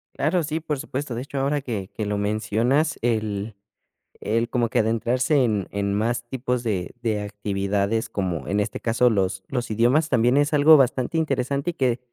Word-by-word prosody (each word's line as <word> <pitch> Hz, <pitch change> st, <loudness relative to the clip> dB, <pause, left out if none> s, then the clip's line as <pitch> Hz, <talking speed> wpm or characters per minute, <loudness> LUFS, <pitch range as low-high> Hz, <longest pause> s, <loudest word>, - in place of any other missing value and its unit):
Claro, 165 Hz, +4 st, +1 dB
sí, 155 Hz, +2 st, -2 dB
por 150 Hz, -2 st, -3 dB
supuesto. 135 Hz, -1 st, -4 dB
De 120 Hz, -, -3 dB
hecho, 140 Hz, +1 st, -5 dB
ahora 140 Hz, +1 st, 0 dB
que 105 Hz, -7 st, -4 dB
que 110 Hz, -, -2 dB
lo 105 Hz, 0 st, -1 dB
mencionas 110 Hz, +8 st, 0 dB
el 110 Hz, -3 st, -1 dB, 0.6 s
el 115 Hz, +3 st, 0 dB
como 120 Hz, -2 st, +1 dB
que 125 Hz, -, +1 dB
adentrarse 120 Hz, +5 st, +2 dB
en 105 Hz, -5 st, 0 dB
en 100 Hz, 0 st, -1 dB
más 115 Hz, +3 st, 0 dB
tipos 125 Hz, -1 st, -2 dB
de 95 Hz, -6 st, -2 dB
de 110 Hz, -3 st, -1 dB
actividades, 105 Hz, +1 st, -1 dB
como 90 Hz, -6 st, -3 dB
en 100 Hz, +1 st, 0 dB
este 105 Hz, -, -2 dB
caso 120 Hz, +2 st, +3 dB
los 95 Hz, -2 st, 0 dB
los 125 Hz, -4 st, -3 dB
idiomas 125 Hz, +9 st, +2 dB
también 125 Hz, +1 st, +3 dB
es 145 Hz, +1 st, +2 dB
algo 150 Hz, +2 st, +7 dB
bastante 130 Hz, +2 st, +2 dB
interesante 140 Hz, 0 st, 0 dB
y -, -, -17 dB
que 130 Hz, -5 st, 0 dB
120 Hz, 185 wpm, -24 LUFS, 105-135 Hz, 0.6 s, algo